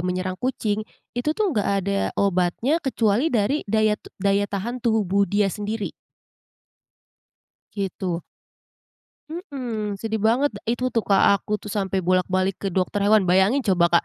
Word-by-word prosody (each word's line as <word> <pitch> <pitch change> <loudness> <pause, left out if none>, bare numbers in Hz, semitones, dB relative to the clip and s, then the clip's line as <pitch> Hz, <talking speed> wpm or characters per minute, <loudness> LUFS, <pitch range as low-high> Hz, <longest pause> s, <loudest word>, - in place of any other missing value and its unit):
menyerang 185 +1 -2
kucing, 220 -5 -1 0.3
itu 300 +6 -1
tuh 415 -5 +1
nggak 210 -6 0 0.2
ada 200 0 0 0.2
obatnya 200 - +1
kecuali 240 0 +1
dari 250 +3 +1
daya 215 0 +3
tub - - -14
daya 200 +1 +1
tahan 235 +5 -4
tubuh 200 -4 +2
dia 200 -1 +1
sendiri. 210 0 -3 1.8
Gitu. 185 -3 -3 1.1
Mhm, 250 - -4
sedih 220 -1 -2
banget 240 +7 +2
de - - -9
itu 255 - -4
tuh, 230 -2 0
Kak, 195 -1 +4 0.2
aku 210 - -7
tuh 205 - -7
sampai 195 -2 -1
bolak-balik 185 +1 +1
ke 195 - -2
dokter 190 +2 0
hewan, 215 -1 +5
bayangin 190 +9 +3
coba, 185 -5 +3
Kak, - - -5
205 Hz, 145 wpm, -23 LUFS, 190-235 Hz, 1.8 s, hewan